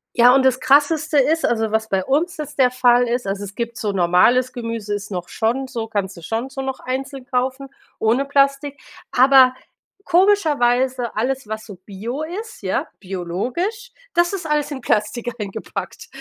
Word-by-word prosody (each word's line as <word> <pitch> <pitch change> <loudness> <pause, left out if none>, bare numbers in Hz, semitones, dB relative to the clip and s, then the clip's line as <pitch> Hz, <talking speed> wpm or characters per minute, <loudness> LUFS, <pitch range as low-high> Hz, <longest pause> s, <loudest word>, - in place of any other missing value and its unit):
Ja, 245 +2 +6
und 270 - +4
das 260 -1 +3
Krasseste 295 +3 +3
ist 320 +5 +2
also 220 -2 0
was 220 0 0
bei 190 -3 0
uns 310 - 0
jetzt 300 -2 -7
der 255 -2 +5
Fall 245 -1 +4
ist 245 +1 -1
also 195 +1 -3
es 200 0 -10
gibt 235 0 -4
so 210 -2 -2
normales 195 +8 +3
Gemüse 230 -4 -4
ist 205 0 -4
noch 180 -3 -5
schon 245 +4 -1
so 230 -3 -5
kannst 200 -3 -3
du - - -10
schon 225 +9 -3
so 270 0 -6
noch 265 -1 -4
einzeln 265 +1 -5
kaufen 260 +1 -2 0.3
ohne 235 +5 +2
Plastik, 275 0 +1 0.3
aber 260 0 +6 0.5
komischerweise 265 - +2
alles, 255 +2 -1
was 220 0 -5
so 205 - -10
bio 230 +9 -5
ist 420 +8 -7
ja, - - -1
biologisch, 240 - -4 0.2
das 345 +2 +2
ist 365 -4 -4
alles 300 -1 0
in 270 -2 -5
Plastik 220 +2 -1
eingepackt. 200 -2 -6
250 Hz, 175 wpm, -20 LUFS, 220-280 Hz, 0.5 s, Ja